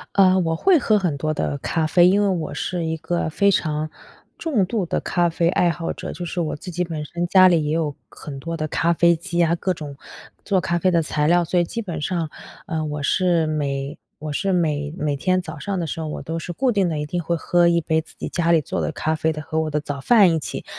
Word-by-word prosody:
呃， 190 -1 +5
我 165 -2 0
会 360 - +4
喝 215 -3 +3
很 175 -7 0
多 155 +2 -1
的 145 -1 -2
咖 160 +2 -1
啡， 175 +2 +5
因 200 +3 +4
为 - - +2
我 175 -4 -2
是 175 -3 -2
一 160 0 -2
个 170 0 -2
非 200 +5 +3
常 155 -3 -1 0.5
重 260 - +1
度 205 -2 -1
的 - - -1
咖 175 -1 +1
啡 165 +1 0
爱 175 -1 +2
好 165 0 -3
者。 - - -6
就 175 +2 -6
是 175 +1 -2
我 155 - -2
自 180 +4 -8
己 180 +2 -1
本 160 -3 -4
身 175 +4 -3
家 185 0 +7
里 170 -4 +3
也 150 - -1
有 155 -4 -1
很 140 -3 -9
多 165 +3 -4
的 155 0 -2
咖 170 +3 +1
啡 170 0 +4
机 170 +1 -1
啊， 165 0 +2
各 185 +2 -1
种 150 -4 -8 0.5
做 195 -2 +1
咖 175 -1 -1
啡 185 - +2
的 170 -2 +2
材 150 0 0
料， 175 +1 +4
所 175 +2 +1
以 - - +3
基 230 +7 -4
本 170 -7 -5
上， 165 -1 -2 0.4
呃， 160 -5 -2
我 150 -1 -4
是 170 +1 +2
每 140 -1 -2 0.2
我 155 -1 -5
是 195 +5 0
每 150 -4 0
每 150 -3 -1
天 185 +6 +1
早 - - -8
上 195 -2 -3
的 170 - -1
时 160 - -5
候 155 - -4
我 150 - -5
都 165 +1 -4
是 175 - -6
固 255 +8 +1
定 195 -5 +1
的 155 - -2
一 150 - -2
定 175 +3 -2
会 170 +1 -1
喝 175 +1 +2
一 170 0 +3
杯 160 +1 +1
自 - - -19
己 - - -4
家 170 -1 +1
里 165 -2 +4
做 - - -3
的 - - -1
咖 155 +1 -1
啡 160 +1 0
的， 155 0 -6
和 160 0 -2
我 155 - -2
的 150 0 0
早 145 -2 -5
饭 200 - +5
一 160 - +1
起。 - - -6
165 Hz, 285 characters per minute, -22 LUFS, 155-180 Hz, 0.5 s, 家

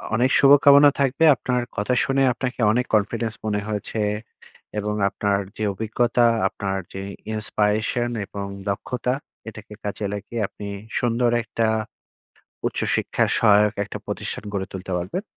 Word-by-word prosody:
অনেক 125 +3 +2
শুভকামনা 140 +1 +7
থাকবে। 140 +3 +1
আপনার 125 -1 -1 0.2
কথা 105 +5 0
শুনে 135 0 +1
আপনাকে 125 +1 -4
অনেক 125 +2 +1
confidence 110 +2 0
মনে 105 -1 0
হয়েছে, 105 +1 -3 0.8
এবং 105 0 -2 0.2
আপনার 100 0 0 0.2
যে 110 - -3
অভিজ্ঞতা 120 +3 +1 0.2
আপনার 95 -1 -3 0.2
যে 95 - -5 0.3
inspiration 110 +2 0 0.2
এবং 100 0 -6 0.2
দক্ষতা 125 +5 -2 0.4
এটাকে 105 -1 -12
কাজে 105 0 -3
লাগিয়ে 105 +3 -5
আপনি 105 - -10 0.3
সুন্দর 120 0 +1
একটা 115 +1 -1 1.0
উচ্চশিক্ষার - - 0
সহায়ক 105 -1 +5
একটা 100 - -7
প্রতিষ্ঠান - - -4
গড়ে 95 -1 -2
তুলতে 95 0 -7
পারবেন। 95 - -4
110 Hz, 130 wpm, -23 LUFS, 105-125 Hz, 1.0 s, শুভকামনা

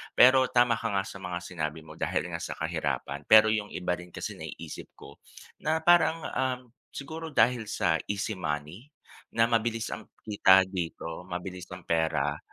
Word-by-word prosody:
Pero 130 +1 +7
tama 120 -2 +3
ka 115 - -2
nga 95 - +2
sa 95 0 -9
mga 90 -2 -4
sinabi 80 -3 -4
mo 80 0 -13
dahil - - -1
nga - - -3
sa - - -5
kahirapan, 70 +2 -3
pero 110 0 +8
yung 105 -1 0
iba 90 -2 -3
rin 90 0 -4
kasi 90 - -6
naiisip - - -8
ko - - -14 0.4
na 160 +1 0
parang, 165 -1 +4
um, 130 -1 -1 0.3
siguro 160 +4 -6
dahil 125 -7 +2
sa 90 -7 +1
easy 105 0 -2
money, 75 - -4 0.5
na 115 - +5
mabilis 115 0 0
ang 110 - -7 0.2
kita 95 -3 +5
dito, 90 -2 -5
mabilis 90 0 -6
ang 90 - -12
pera. 80 -3 0
95 Hz, 170 wpm, -28 LUFS, 85-120 Hz, 0.5 s, pero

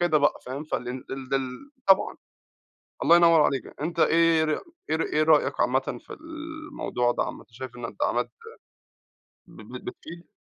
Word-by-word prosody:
كده 175 -3 +3
بقى، 145 - +3
فاهم، 135 +4 -5
فال 125 -5 -3 0.2
ال 135 -1 -6
دل 135 - -3 0.2
طبعًا. 195 -1 +4 0.9
الله 170 - +7
ينور 165 -2 +6
عليك، 135 - -1
أنت 165 +2 -2
إيه 165 -1 +4
ر 155 - 0 0.4
إيه 155 - +3
ر 165 - 0
إيه 155 - +1
رأيك 155 -1 +3
عامةً 130 -1 +1
في - - -9
الموضوع 315 - -3
ده - - 0
عامةً؟ - - -6
شايف 125 +1 -8
إن 120 - -7
الدعامات - - -1 1.2
ب - - -13
ب - - -10
بتفيد؟ 175 - -9
155 Hz, 160 wpm, -26 LUFS, 130-170 Hz, 1.2 s, الله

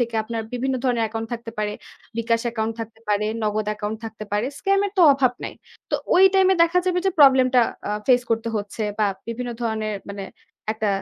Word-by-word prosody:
থেকে 235 -1 -1
আপনার 225 +1 -4
বিভিন্ন 260 +2 -1
ধরনের 240 -3 +2
account 225 +1 -5
থাকতে 235 -1 -5
পারে, 210 0 -1 0.5
বিকাশ 230 0 +1
account 225 -1 -2
থাকতে 225 0 -8
পারে, 210 0 +1 0.2
নগদ 215 0 0
account 210 +1 -4
থাকতে 220 -1 -7
পারে। 210 +3 +1
Scam 395 0 +2
এর 395 - -7
তো - - +7
অভাব 265 -3 +2
নাই। - - -6 0.4
তো - - 0 0.2
ওই 370 - +7
time 380 -1 +5
এ - - +3
দেখা 335 +2 +3
যাবে 360 -1 +2
যে - - +4
problem 265 -2 +7
টা 250 - +7 0.3
আ - - -1 0.2
face 250 -1 +4
করতে 230 0 0
হচ্ছে 205 +1 -4 0.2
বা 215 - +3 0.2
বিভিন্ন 240 +1 -4
ধরনের 220 -2 -2
মানে 200 0 -6 0.5
একটা 220 -1 -2
230 Hz, 205 wpm, -23 LUFS, 215-255 Hz, 0.5 s, তো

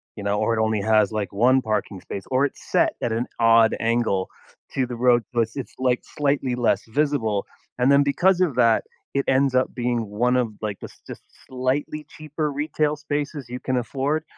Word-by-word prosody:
You 105 - -7
know, 100 0 0
or 115 - +1
it - - +2
only 110 -2 0
has, 110 -1 +3
like, 105 -2 -3
1 125 +6 +4
parking 105 -4 -2
space, 95 +1 -7
or 130 +2 +3
it's 140 - -6
set - - +3
at 120 - -1
an 115 +2 -1
odd 115 -1 +5
angle 115 -5 0 0.4
to 130 - +1
the 125 0 -6
road, 120 0 +3
plus 115 +1 0
it's, 135 - -6
like, 125 -1 +1 0.2
slightly 140 -3 +1
less 120 -4 +1
visible, 115 -6 0 0.3
and 125 +2 +3
then 140 0 +6
because 175 +6 +2
of 175 -8 +1
that, 115 -1 +3 0.3
it 140 0 0
ends 135 0 +2
up 130 - +1
being 120 -2 -1
one 120 +5 +1
of, 120 -4 0
like, 105 -2 -4
this - - -11
just - - -9 0.3
slightly 135 +4 -2
cheaper 155 0 -4
retail 150 +1 -1
spaces 145 -2 -4
you 125 +1 -5
can 130 - -2
afford, 135 +5 -1
125 Hz, 195 wpm, -23 LUFS, 110-140 Hz, 0.4 s, then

